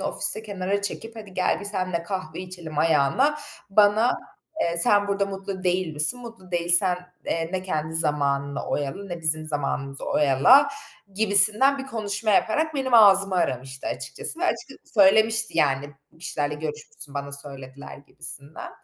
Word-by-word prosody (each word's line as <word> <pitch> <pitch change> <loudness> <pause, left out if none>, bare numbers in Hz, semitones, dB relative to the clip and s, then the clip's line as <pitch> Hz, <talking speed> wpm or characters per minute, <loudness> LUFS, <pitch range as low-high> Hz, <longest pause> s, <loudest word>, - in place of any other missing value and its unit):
ofiste 220 - +1
kenara 200 -1 -3
çekip 225 +3 -6
"Hadi 205 -4 -11
gel 185 - 0
bir - - -8
seninle 185 -4 -3
kahve 170 -3 -6
içelim." 175 -5 -8
ayağına 165 - +1 0.3
bana, 210 +4 +3 0.4
eee, 170 0 -1
"Sen 205 +4 +3
burada 200 0 -1
mutlu 195 -1 -7
değil 180 -2 -1
misin? 155 +12 +2
Mutlu 230 -6 -13
değilsen, 175 +1 +5 0.3
eee, 165 0 -3
ne 185 - -3
kendi 155 -3 -4
zamanını 140 -3 -1
oyala 145 +7 -4
ne 175 -3 -7
bizim 155 -1 +1
zamanımızı 140 -2 -3
oyala." 150 - +4 0.5
gibisinden 215 +6 +6
bir 270 - -7
konuşma 215 -3 -3
yaparak 305 +10 +1
benim 260 -3 -1
ağzımı 195 -3 +6
aramıştı 135 -6 -3
açıkçası 330 - -3
ve 370 - -1
açıkçası - - -5
söylemişti 220 -1 +3
yani, 140 -1 0 0.2
"Bu 160 - -24
kişilerle 150 -3 -3
görüşmüşsün, 150 -1 -7
bana 140 0 -6
söylediler." 140 -1 -4
gibisinden. 140 +1 -5
185 Hz, 145 wpm, -23 LUFS, 150-205 Hz, 0.5 s, gibisinden